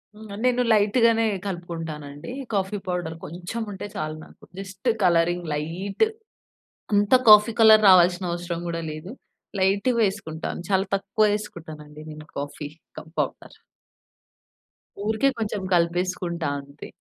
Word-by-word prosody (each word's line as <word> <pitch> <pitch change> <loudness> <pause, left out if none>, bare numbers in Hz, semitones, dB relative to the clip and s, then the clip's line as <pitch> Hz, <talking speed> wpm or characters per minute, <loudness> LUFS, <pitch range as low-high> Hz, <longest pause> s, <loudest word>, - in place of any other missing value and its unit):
హ్మ్. 215 0 -12
నేను 250 0 +3
లైట్‌గానే 225 +2 +3 0.2
కలుపుకుంటానండి. 165 -3 -6 0.2
Coffee 195 +1 -1
powder 175 -3 -3
కొంచెం 175 +7 -6
ఉంటే 200 +1 -6
చాలు 155 0 -3
నాకు. - - -20 0.2
Just 195 +4 -4
colouring 175 0 +2
light. 175 - -1 0.9
అంతా 205 +5 +5
కాఫీ 210 +2 +8
కలర్ 220 -1 +8
రావాల్సిన 180 0 +5
అవసరం 170 0 -4
గూడా 165 0 -3
లేదు. 155 +7 -8 0.5
లైట్‌గా 200 +6 +2
వేసుకుంటాను. 180 -5 -3
చాలా 190 0 +2
తక్కువ 200 +2 +1
ఏసుకుంటాను 160 -7 -9
అండి, 150 +1 -12
నేను 155 0 -11
కాఫీ 145 +1 -5 0.3
కప్ 160 - -10
పౌడర్. - - -3 1.6
ఊరికే 220 +5 +2
కొంచెం 210 -2 -2
కలిపేసుకుంటా 175 -1 0
అంతే. 140 +1 -12
180 Hz, 120 wpm, -24 LUFS, 165-205 Hz, 1.6 s, కాఫీ